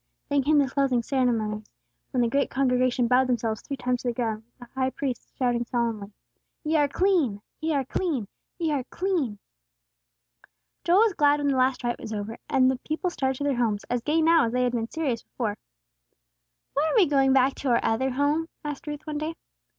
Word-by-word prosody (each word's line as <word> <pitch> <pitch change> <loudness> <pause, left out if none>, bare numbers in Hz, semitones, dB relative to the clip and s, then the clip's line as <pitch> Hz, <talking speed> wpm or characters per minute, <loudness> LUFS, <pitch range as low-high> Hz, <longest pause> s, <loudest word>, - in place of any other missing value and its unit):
Then 285 -1 +3
came 295 +3 +3
the 280 -2 +4
closing 265 -3 +1
ceremonies, 220 -5 0 0.4
when 255 - 0
the 240 - +3
great 275 +4 +1
congregation 255 -2 +2
bowed 250 +2 +4
themselves 225 -3 -1
three 275 - -5
times 250 -1 -1
to - - -4
the 240 - -1
ground, 225 -3 -2 0.2
with 245 - -11
the - - -41
High 260 0 0
Priest 260 -2 -4
shouting 245 -2 +1
solemnly, 230 -4 -2 0.5
"Ye 315 +1 0
are 290 -1 +4
clean! 315 - +1 0.2
Ye 315 -1 0
are 275 -2 0
clean! 275 - -2 0.3
Ye 330 -3 0
are 280 -3 0
clean!" 335 - -1 1.5
Joel 355 +4 +5
was 450 -3 +4
glad 290 -2 +3
when 285 -1 +1
the 275 - +1
last 260 0 +1
rite 240 0 -1
was 220 - -6
over, 210 +2 -5
and 260 -3 +4
the 260 - -4
people 320 +5 -2
started 265 -5 -1
to 285 - -4
their 280 -3 0
homes, 220 -4 0
as 245 -1 0
gay 315 +5 +1
now 330 -5 +5
as 225 - -4
they 250 0 +2
had 250 - +1
been 230 -1 -2
serious 280 -8 -2
before. 215 -5 -4 1.2
"When 285 - +1
are 315 - 0
we 420 -6 +6
going 275 -3 +3
back 265 0 +4
to 275 - -2
our 235 - +4
other 260 +4 +1
home?" 290 +5 0 0.2
asked 295 0 -5
Ruth, 295 0 -5
one 300 -1 -3
day. 315 +2 -3
265 Hz, 210 wpm, -26 LUFS, 240-295 Hz, 1.5 s, we